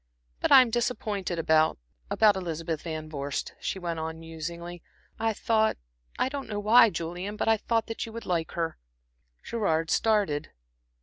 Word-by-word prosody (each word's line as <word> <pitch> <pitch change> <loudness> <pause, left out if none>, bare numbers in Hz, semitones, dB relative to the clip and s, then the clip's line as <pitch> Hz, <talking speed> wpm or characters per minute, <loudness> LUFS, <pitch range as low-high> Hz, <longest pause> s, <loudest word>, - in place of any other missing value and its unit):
But - - 0
I'm 255 -3 +8
disappointed 215 -6 -1
about 160 -1 +3 0.3
about 210 -2 +4
Elizabeth 165 -3 -3
Van 155 -2 -5
Vorst," 140 -2 -4
she - - -3
went 170 -3 -3
on, 160 0 -4
musingly. 170 +2 -7 0.4
"I 225 0 +1
thought 220 0 +1 0.4
I - - +2
don't 275 0 -5
know 205 -1 -2
why, 230 +3 +7
Julian 175 +4 -4
but - - -2
I 225 0 +5
thought 225 +1 0
that 225 - -4
you - - -8
would 230 +1 -7
like 170 -3 -1
her." 165 - -2 0.6
Gerard 165 -8 0
started. 200 -10 +1
180 Hz, 160 wpm, -28 LUFS, 160-220 Hz, 0.6 s, I'm